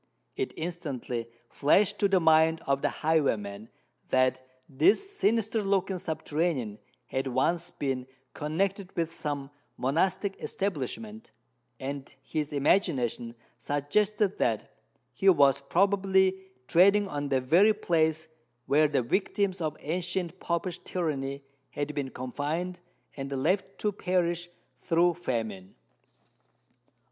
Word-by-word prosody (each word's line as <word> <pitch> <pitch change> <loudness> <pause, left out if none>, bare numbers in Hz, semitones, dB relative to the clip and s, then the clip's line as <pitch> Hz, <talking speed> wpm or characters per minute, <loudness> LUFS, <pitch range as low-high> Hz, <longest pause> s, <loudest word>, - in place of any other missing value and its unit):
It 395 -2 -2
instantly 140 -9 -4 0.2
flashed 200 +11 +3
to 200 - +4
the 195 -1 +3
mind 160 0 +4
of 140 0 +1
the - - +2
highwayman 110 -10 0 0.4
that 130 0 +2 0.3
this 215 - +2
sinister 225 - +1
looking 195 -2 0
subterranean 150 -9 -2 0.3
had 130 +2 -2
once 160 +7 0
been 130 -3 -3 0.3
connected 190 +5 -2
with 165 -1 -1
some 145 -3 -4 0.3
monastic 185 +8 0
establishment; 205 - -4 0.5
and 135 +1 -5
his 150 -2 -3
imagination 135 - +1 0.2
suggested 200 +8 0
that 110 -3 0 0.4
he 195 +9 +3
was 140 -6 +5
probably 190 +3 +2 0.2
treading 200 +4 +5
on 145 -4 -3
the 135 -1 +2
very 170 +12 +5
place 160 -6 +1 0.4
where 150 +2 +4
the 140 -4 +1
victims 190 - 0
of 155 -2 -2
ancient 175 +2 -2
Popish 170 +1 -2
tyranny 140 -5 -3 0.3
had 145 +1 -3
been 140 -2 -2
confined 150 +8 -3 0.4
and 135 -1 -5
left 185 +9 0
to 210 - 0
perish 175 -3 -1 0.3
through 170 +1 +3
famine. 110 - -4
160 Hz, 115 wpm, -28 LUFS, 140-190 Hz, 0.5 s, was